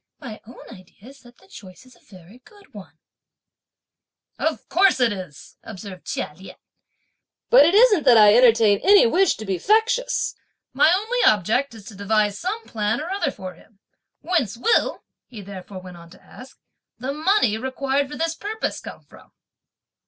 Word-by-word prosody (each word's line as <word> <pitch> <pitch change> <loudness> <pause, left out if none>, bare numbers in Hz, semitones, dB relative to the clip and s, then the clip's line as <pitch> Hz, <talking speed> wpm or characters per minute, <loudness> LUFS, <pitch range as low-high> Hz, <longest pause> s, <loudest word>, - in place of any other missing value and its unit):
My 240 -7 -10
own 245 +1 -14
idea 195 +3 -16
is 275 0 -17
that 240 -1 -19
(the 190 - -24
choice) 190 +4 -14
is 255 -1 -20
a - - -25
very 185 +4 -17
good 405 - -22
one." 190 -6 -13 1.4
"Of - - -3
course 380 -4 +2
it 240 -4 +2
is!" 180 -3 -11
observed 195 -3 -11
Chia - - -4
Lien; 190 +4 -13 1.0
"but - - +7
it 350 - +1
isn't 430 -5 +5
that 245 -3 +6
I 210 -1 +7
entertain 225 -4 +4
any 400 +4 +5
wish 370 +11 +2
to 215 - -9
be 190 -3 -3
factious; 460 - 0 0.4
my 315 - +4
only 435 +7 -1
object 225 +6 +1
is 215 -3 -14
to 210 - -12
devise 205 0 -1
some 420 +6 -5
plan 210 -1 -2
or 320 +4 -6
other 390 -3 -1
for 185 -1 -9
him. 195 +4 -23 0.4
Whence 310 - -2
will," 450 - 0 0.2
he 215 -5 -11
therefore 190 -1 -10
went 180 -1 -12
on 170 0 -15
to 180 - -19
ask, 260 +1 -15 0.4
"the 260 +4 -5
money 310 - +1
required 270 +2 -2
for 295 - -8
this 330 0 -2
purpose 420 +6 -5
come - - -11
from?" - - -19
240 Hz, 175 wpm, -21 LUFS, 200-340 Hz, 1.4 s, but